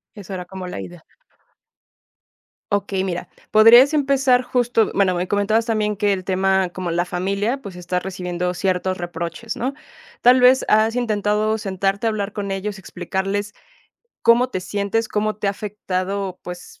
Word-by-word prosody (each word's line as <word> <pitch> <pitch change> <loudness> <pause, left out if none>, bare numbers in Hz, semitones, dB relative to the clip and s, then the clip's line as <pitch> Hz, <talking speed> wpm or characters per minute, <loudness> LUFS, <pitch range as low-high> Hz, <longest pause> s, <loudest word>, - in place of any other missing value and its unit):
Eso 200 -2 -8
era 180 -1 -5
como 185 0 -8
la 180 - -6
idea. 175 -2 -10 1.7
Okey, 200 -1 0
mira, 180 -2 -4 0.2
podrías 235 +6 +8
empezar 270 -3 +3
justo 245 -3 +1
Bueno, 190 -2 +2
me 180 +1 -1
comentabas 205 +3 +1
también 210 -2 0
que 205 0 +2
el 190 -1 -2
tema, 190 0 +1
como 175 -1 -4
la 175 +1 +1
familia, 200 +8 -2
pues 200 -7 -9
está 180 0 -3
recibiendo 180 -1 -3
ciertos 185 0 -1
reproches, 175 +5 -5
¿no? 260 +4 -2 0.5
Tal 250 +1 +6
vez, 255 +1 +5
¿has 220 +1 +3
intentado 215 -2 0
sentarte 195 +1 -1
a - - +3
hablar 210 -1 -3
con 200 -2 -4
ellos 195 +1 -4
y - - -10
explicarles 195 +3 -3 0.7
cómo 240 +2 +5
te 215 - -3
sientes, 200 +4 -1
cómo 215 0 -1
te 210 - -3
ha - - +3
afectado, 195 -2 -4
pues 180 0 -9
200 Hz, 160 wpm, -21 LUFS, 185-220 Hz, 1.7 s, podrías